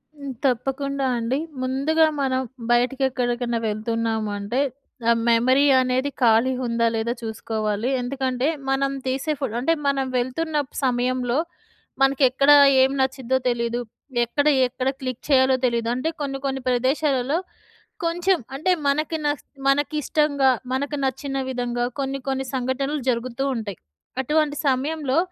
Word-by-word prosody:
హ్మ్, 280 -2 -7
తప్పకుండా 270 +2 0
అండి. 235 +4 -1 0.2
ముందుగా 280 +5 +2 0.2
మనం 260 -1 +1 0.3
బయటకెక్కడికైనా 245 -1 +1
వెళ్తున్నాము 220 0 -1
అంటే 205 +6 -2 0.5
ఆహ్, 230 0 +4
మెమరీ 255 +4 +4 0.2
అనేది 255 +2 0
ఖాళీ 235 +2 +4
ఉందా 230 -1 +1
లేదా 225 +1 -1
చూసుకోవాలి. 220 0 -2
ఎందుకంటే 260 +1 -1 0.2
మనం 275 0 +1
తీసే 265 +4 -1
ఫో 280 - 0
అంటే 280 +7 +2
మనం 275 -1 +1
వెళ్తున్న 280 +6 -2 0.3
సమయంలో 250 0 +1 0.6
మనకి 270 +1 +3
ఎక్కడ 275 +3 +2 0.3
ఏం 265 +1 +4
నచ్చిదో 260 -1 0
తెలీదు. 235 0 -1 0.5
ఎక్కడ 285 +5 0 0.2
ఎక్కడ 255 +1 -2
క్లిక్ 255 -2 -4
చేయాలో 260 -1 +5
తెలీదు. 235 -2 0
అంటే 255 +6 -1
కొన్ని 275 -1 -2
కొన్ని 270 -1 -2
ప్రదేశాలలో 265 +2 +1 0.7
కొంచెం 350 +3 +2 0.2
అంటే 315 +7 +1 0.2
మనకి 305 +3 +1
న - - +3 0.4
మనకిష్టంగా 290 0 +2 0.2
మనకు 285 +3 -1
నచ్చిన 270 +1 -2
విధంగా 245 -1 -1
కొన్ని 275 0 -2
కొన్ని 265 0 -1
సంఘటనలు 265 +3 -1
జరుగుతూ 245 +1 -1
ఉంటాయి. 210 -6 -5 0.4
అటువంటి 300 +2 +1
సమయంలో 275 +1 0
260 Hz, 125 wpm, -23 LUFS, 240-275 Hz, 0.7 s, చేయాలో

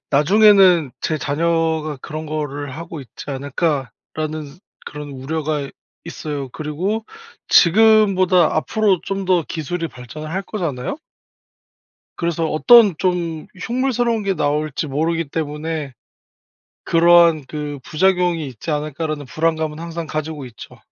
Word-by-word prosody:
'나중에는 180 0 +5
제 155 -1 -1
자녀가 160 +1 0
그런 155 +1 -6
거를 145 -2 -4
하고 165 -1 -7
있지 130 - -11
않을까.'라는 145 +1 -3 0.3
그런 150 -1 -7
우려가 145 +1 -3 0.4
있어요. 150 -4 -5
그리고 175 - -3 0.4
지금보다 190 -3 +5
앞으로 200 +2 +1
좀 195 0 -3
더 180 -2 +2
기술이 165 +2 -3
발전을 135 +4 -9
할 190 +4 -2
거잖아요? 170 - -4 1.2
그래서 170 -1 -1
어떤 210 +5 +6
좀 170 -3 -1
흉물스러운 240 0 0
게 195 -1 0
나올지 150 -1 -1
모르기 160 +3 -1
때문에 150 -1 -4 0.9
그러한 170 -2 +5
그 150 -1 -5
'부작용이 175 -1 +1
있지 130 +5 -7
않을까?'라는 150 0 -3
불안감은 155 +2 -1
항상 170 0 -5
가지고 155 -3 -4
있죠. 120 -2 -12
160 Hz, 285 characters per minute, -20 LUFS, 150-180 Hz, 1.2 s, 어떤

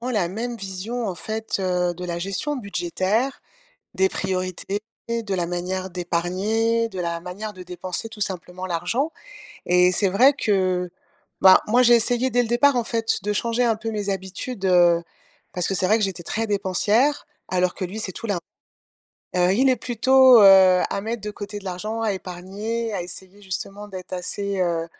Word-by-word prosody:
vraiment 250 +2 -3
la 200 -7 +1
même 230 +6 -4
vision, 195 +5 -4
en 185 - -3
fait, 220 +5 -4
heu, 180 -2 0
de 180 +1 -7
la 170 -1 -3
gestion 195 +11 -3
budgétaire, 200 +4 -1 0.5
des 190 0 +2
priorités, 190 +1 -3 0.3
de 230 -4 -2
la 175 -2 -1
manière 185 +2 -3
d'épargner, 195 +7 0
de 185 - -6
la 170 -1 -2
manière 190 +5 -6
de 185 -2 -10
dépenser, 180 +4 -5
tout 215 -1 -5
simplement, 185 -1 -5
l'argent. 185 - -1 0.5
Et 180 0 +4
c'est 195 +2 +1
vrai 250 +10 +5
que, 185 -7 0 0.5
ben, 190 -1 +8
moi 240 +4 +3
j'ai 240 -1 +6
essayé 245 +2 +2
dès 245 0 +2
le 235 - -4
départ, 255 +3 +4
en 240 - +1
fait, 225 -1 -1
de 210 - -1
changer 230 +3 0
un 230 -2 +2
peu 220 +1 -4
mes 205 -2 -2
habitudes, 195 +3 -4
heu, 175 -2 +5 0.5
parce 180 - -1
que 195 - -1
c'est 185 - +1
vrai 215 +4 +4
que 220 - +1
j'étais 185 -3 -4
très 225 +6 -2
dépensière, 210 +7 +1 0.2
alors 180 -1 +1
que 185 - -3
lui 195 +5 -7
c'est 190 - -4
tout 230 - -7
l'inv 200 -3 0 1.0
heu, 180 +1 +3
il 260 +5 +3
est 255 - +3
plutôt, 255 +1 +5
heu, 190 -2 +7
à - - -2
mettre 225 +2 -3
de 210 - -4
côté 205 0 -7
de 200 - -14
l'argent, 210 +5 -4
à 220 -2 0
épargner, 200 +5 -5
à 185 - -2
essayer 185 +3 -11
justement 195 +2 -6
d'être 185 -2 -9
assez, 195 +2 -3
heu, 170 -2 0
195 Hz, 185 wpm, -23 LUFS, 180-225 Hz, 1.0 s, ben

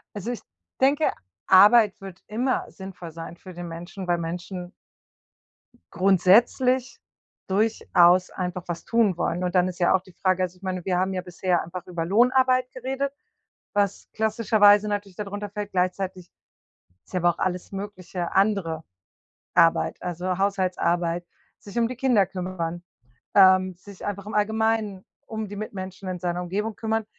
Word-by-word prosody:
Also 205 +4 -4
ich 240 - -6 0.4
denke, 280 +3 +3 0.3
Arbeit 205 +2 +6
wird 190 -2 -10
immer 245 +5 -1
sinnvoll 190 -4 -9
sein 165 +1 -8
für 185 +1 -12
den 175 0 -7
Menschen, 175 +3 -7
weil 175 -1 +1
Menschen 175 +2 -5 1.2
grundsätzlich 235 +8 +3 0.5
durchaus 185 -3 +3
einfach 180 -1 -4
was 170 -1 -5
tun 225 -6 +2
wollen 175 +1 -1
und 180 0 -2
dann 180 0 +4
ist 180 0 -8
ja 175 - +4
auch 190 - +2
die 185 -1 -18
Frage 185 0 +1
also 180 0 -3
ich 190 - -32
meine, 185 -2 -3
wir 180 -2 0
haben 190 +1 0
ja 185 - -2
bisher 180 0 -1
einfach 180 +2 -8
über 170 -2 -3
Lohnarbeit 255 +5 +3
geredet, 270 +2 -3 0.6
was 200 -1 0
klassischer 220 0 0
weise 205 +1 +7
natürlich 205 -2 -3
da 210 - -4
drunter 205 +1 -5
fällt, 205 0 -5
gleichzeitig 185 -1 -2 0.7
ist - - -22
ja 180 - +1
aber 175 - +4
auch - - -14
alles 180 -1 -2
Mögliche 190 -3 -5
andere 190 -6 +1 0.7
Arbeit. 165 -1 +3
Also 180 +1 -3
Haushaltsarbeit, 175 -3 0 0.3
sich 200 +1 -12
um 230 - +2
die 255 - -6
Kinder 245 -6 +3
kümmern, 180 -2 -4 0.5
ähm, 185 -2 +6
sich 190 +2 -13
einfach 200 -1 -4
im 210 - -6
Allgemeinen 220 -2 0 0.2
um 220 -2 -5
die 205 - -8
Mitmenschen 190 -2 -6
in 180 -1 -4
seiner 175 0 -2
Umgebung 205 +4 -3
kümmern 220 0 -1
190 Hz, 160 wpm, -25 LUFS, 180-210 Hz, 1.2 s, weise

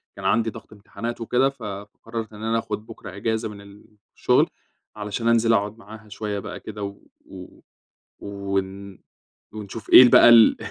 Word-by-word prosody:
كان 100 - -9
عَندي 115 +3 +2
ضغْط 110 - -12
إمتحانات 115 +3 -7
وكده 125 +4 +1
ف 135 -4 -14
فقرّرت 105 +2 -7
إن 105 +1 -10
أنا 115 +1 0
آخُد 105 -1 -6
بُكرة 110 -5 -11
أجازة 110 +2 -2
من 100 -1 -11 0.5
الشغل - - +2 0.5
علشان 105 +2 -4
أنزِل 115 0 +3
أقعُد 105 +1 -1
معاها 110 -1 -14
شوية 105 -1 -4
بقى 105 +1 -8
كده 105 -1 -8
و 100 0 -6 0.3
و 90 -1 -13 0.6
ون 100 -1 -5 0.5
ونشوف 105 +1 -9
إيه - - +10
ال 120 - +5
بقى 120 - +7
ال 115 -2 +7
105 Hz, 160 wpm, -23 LUFS, 100-115 Hz, 0.6 s, إيه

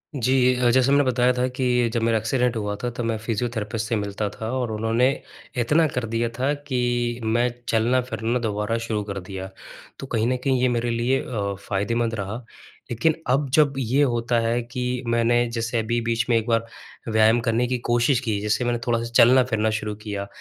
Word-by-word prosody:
जी। 130 -1 +1 0.2
अ, 125 -1 +2
जैसे 130 +2 +3
मैंने 145 0 +5
बताया 125 -1 +2
था 125 0 0
कि 125 -2 +1
जब 115 - 0
मेरा 115 0 +2
एक्सीडेंट 120 +2 0
हुआ 105 -1 -2
था, 120 - 0
तब 120 0 -5
मैं 115 -1 -1
फ़िजियोथेरेपिस्ट 110 -1 -3
से 115 - +1
मिलता 105 0 -2
था 110 +2 -6
और 125 -3 -2
उन्होंने 115 +3 +1 0.6
इतना 155 +5 +3
कर 125 -1 -1
दिया 115 +1 -1
था 135 +3 +1 0.2
कि 120 -2 0
मैं 120 +2 +2 0.2
चलना-फिरना 120 0 0
दोबारा 105 0 -1
शुरू 105 -2 -1
कर 100 -1 -5
दिया। 95 0 -7 0.5
तो 135 - -7
कहीं 115 -2 0
न 125 +1 +1
कहीं 130 -3 +1
ये 130 - +4
मेरे 120 +1 -1
लिए 120 +3 +1
अ, 100 -5 -3
फ़ायदेमंद 110 +4 -1
रहा। 110 +4 -5 0.5
लेकिन 120 +8 +2 0.2
अब 135 +2 +2
जब 150 -2 +4
ये 135 +2 +1
होता 120 -2 +1
है 115 +1 0
कि, 125 +1 -3
मैंने 120 +1 +2
जैसे 115 0 -2
अभी 120 +2 0
बीच 115 0 0
में 120 - +4
एक 115 0 -2
बार 115 -1 +1 0.4
व्यायाम 110 +1 +4
करने 115 +1 +1
की 125 +1 -1
कोशिश 120 +2 +3
की, 110 -5 -2
जैसे 105 +4 0
मैंने 120 -1 0
थोड़ा-सा 115 -1 +1
चलना-फिरना 120 -3 +5
शुरू 105 0 -4
किया 105 -2 -5
120 Hz, 195 wpm, -23 LUFS, 110-125 Hz, 0.6 s, मैंने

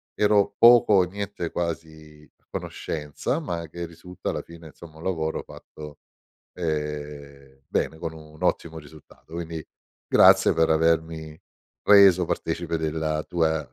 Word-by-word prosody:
ero 100 -1 +2
poco 115 -2 +7
o 95 -2 +6
niente 100 -1 -5
quasi 80 -3 -6
a - - -41
conoscenza, 75 - -4
ma 85 - -4
che 85 +2 -6
risulta 85 +2 -8
alla - - -4
fine, 85 -1 -13
insomma, 80 0 -14
un 80 - -12
lavoro 80 -4 -2
fatto, 75 -1 -12 0.6
ehm, 75 -4 -5
bene 80 - -1
con 80 -1 -5
un 75 -1 -14
ottimo 80 -1 -1
risultato. 80 +2 -17
Quindi 80 -2 -5 0.4
grazie - - +6
per 80 0 +2
avermi 80 -1 0 0.4
reso 95 -3 +7
partecipe 85 0 -2
della 80 -1 -2
tua 80 -3 -1
80 Hz, 130 wpm, -25 LUFS, 75-85 Hz, 0.6 s, poco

